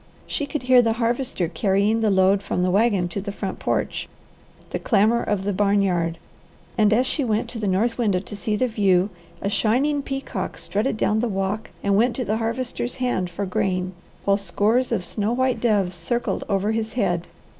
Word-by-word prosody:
She 290 - -3
could 300 -3 -4
hear 250 0 +6
the 225 -2 +1
Harvester 235 -5 -1
carrying 200 +6 +1
the 220 - +3
load 195 0 +4
from 180 - -1
the 180 - +2
wagon 200 -3 +2
to 200 - -4
the 200 +1 -4
front 195 -1 -5
porch, - - -2 0.6
the - - -2
clamour 220 +2 +3
of 205 -2 -1
the 205 +1 -1
barn 200 +1 +2
yard; 170 -3 0 0.6
and 215 -2 +4
as 240 +4 +3
she 285 +2 0
went 220 -3 0
to 235 - -6
the 210 - -1
north 220 +6 +1
window 205 -6 +2
to 200 +3 -6
see 210 +1 -1
the 255 +5 +1
view, 200 -4 +2 0.3
a - - 0
shining 270 +8 +2
peacock 270 0 -4
strutted 215 +3 -1
down 215 0 +1
the 240 - +1
walk 195 +2 -2
and 200 0 +2
went 235 +3 +3
to 255 - -2
the 215 +1 0
Harvester's 240 +2 -2
hand 245 -8 -1
for 195 +4 -4
grain, 185 0 -1 0.3
while 200 0 +4
scores 210 +6 +1
of 190 -6 0
snow 210 +5 -1
white 260 0 +1
doves 205 -6 +2
circled 235 +8 -2
over 200 +1 +1
his 220 0 -2
head. 175 -8 0
210 Hz, 200 wpm, -23 LUFS, 195-235 Hz, 0.6 s, hear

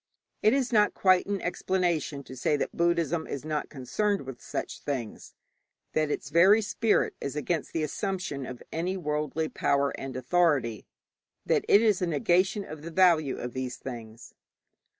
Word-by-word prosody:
It 215 - +5
is 260 -3 0
not 210 -1 +4
quite 185 -1 +4
an 200 -1 -1
explanation 175 -5 -1
to 130 - -10
say 145 +4 +1
that - - -3
Buddhism 170 -1 +1
is 140 +1 -5
not 155 -1 -2
concerned 195 - -1
with 130 -2 -9
such - - -5
things; 130 -7 -5 0.6
that 155 -1 +1
its 145 - -4
very 185 +7 +6
spirit 220 +1 +1
is 140 - -4
against 155 +2 -2
the 160 - -1
assumption 165 - -3
of 125 -1 -8
any 180 +4 -2
worldly 150 -1 -2
power 140 -2 +1
and 135 -1 -5
authority; 130 - +1 0.6
that - - +1
it 205 - +7
is 210 -5 +3
a 180 - +1
negation 180 +6 +2
of 155 -1 -9
the 165 - -7
value 165 -6 +3
of 120 -1 -5
these 130 -1 -4
things. 115 -3 -9
155 Hz, 165 wpm, -28 LUFS, 135-185 Hz, 0.6 s, it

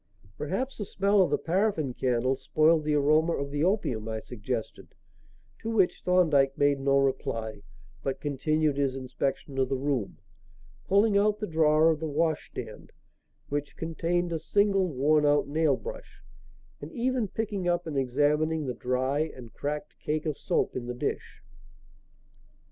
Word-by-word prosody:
"Perhaps 260 0 -3
the 205 - -2
smell 200 +1 +2
of 185 - +3
the - - +2
paraffin 170 - 0
candle 130 +1 +1
spoiled 155 +3 +2
the 150 -1 +1
aroma 155 +3 +3
of 140 0 -3
the 145 +1 -1
opium," 150 - 0
I 110 0 -3
suggested; 115 0 -6 0.6
to 225 - -5
which 205 -5 +2
Thorndyke 155 -7 +3
made 145 -1 +3
no 140 0 +2
reply 130 -6 -1 0.4
but 135 -1 -3
continued 145 +1 0
his 135 -2 0
inspection 135 +1 -3
of 130 -1 +1
the 135 - 0
room, 130 -6 -2 0.7
pulling 200 +1 +4
out 210 +1 +2
the 210 - -3
drawer 160 -2 +4
of 155 - -2
the 160 - -3
washstand 150 -7 -3 0.6
which 145 0 -3
contained 170 +2 -1
a 165 - -1
single, 195 +3 +2
worn 150 +1 +2
out 145 -1 +3
nail 155 +1 +2
brush - - -9 0.6
and - - -8
even 250 -3 0
picking 205 -3 -3
up 175 0 +1
and 160 -3 -5
examining 150 +4 +1
the 125 - -2
dry 130 +4 -1 0.2
and 120 -3 -11
cracked 150 +1 -5
cake 155 +1 -2
of 155 -2 -1
soap - - -1
in 120 -1 -4
the 125 - -4
dish. 125 - -4
150 Hz, 155 wpm, -28 LUFS, 135-175 Hz, 0.7 s, pulling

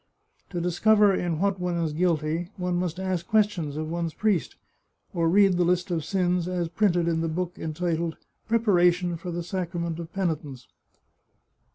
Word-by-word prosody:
To 175 - -3
discover 205 +4 +4
in 175 -3 -1
what 195 +2 0
one 180 -1 -1
is 165 -3 -1
guilty, 165 0 0
we 180 -1 -2
must 175 0 -1
ask 185 -2 -2
questions 205 -9 +1
of 155 0 -3
one's 165 0 -3
priest, 210 -6 0 0.6
or 165 -2 +1
read 195 0 +4
the 180 - +3
list 180 +1 +1
of 165 -3 -1
sins 180 0 0
as 175 -2 -2
printed 175 -2 +1
in 165 -1 +1
the 165 - 0
book 175 +2 -3
entitled 165 +1 -2 0.3
Prepara 205 -6 +4
tion 175 0 -3
for 170 +2 -7
the 170 0 -3
Sacrament 170 -2 -3
of 170 -1 -7
Penitence. 155 - -3
175 Hz, 170 wpm, -26 LUFS, 165-185 Hz, 0.6 s, discover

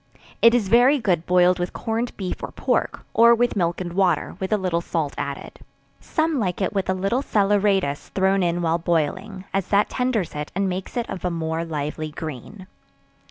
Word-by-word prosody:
It 230 +1 +7
is 225 -5 +1
very 245 +7 +5
good 180 - 0
boiled 180 0 +4
with 175 0 -3
corned 230 +2 -3
beef 185 -3 -4
or - - -4
pork, - - -1
or 235 +1 +6
with 245 +1 +1
milk 170 -3 0
and 175 -2 -5
water, 180 -5 +1
with 190 0 -3
a 215 - +3
little 180 -3 -1
salt 160 -4 -2
added. 140 0 -6 0.4
Some 315 -3 -1
like 185 -5 -1
it 195 - -1
with 195 -2 -1
a 185 - +2
little 195 +7 0
salaeratus 200 - +1
thrown 190 0 +1
in 175 0 0
while 165 +1 +1
boiling, 185 +4 -2
as 195 -2 0
that 205 +1 +2
tenders 250 -8 -1
it 150 0 -5
and 195 +1 +1
makes 185 +5 -4
it 235 - -1
of 190 - -6
a 180 - 0
more 165 -1 -2
lively 155 -1 -4
green. 155 - -8
185 Hz, 195 wpm, -23 LUFS, 170-210 Hz, 0.4 s, It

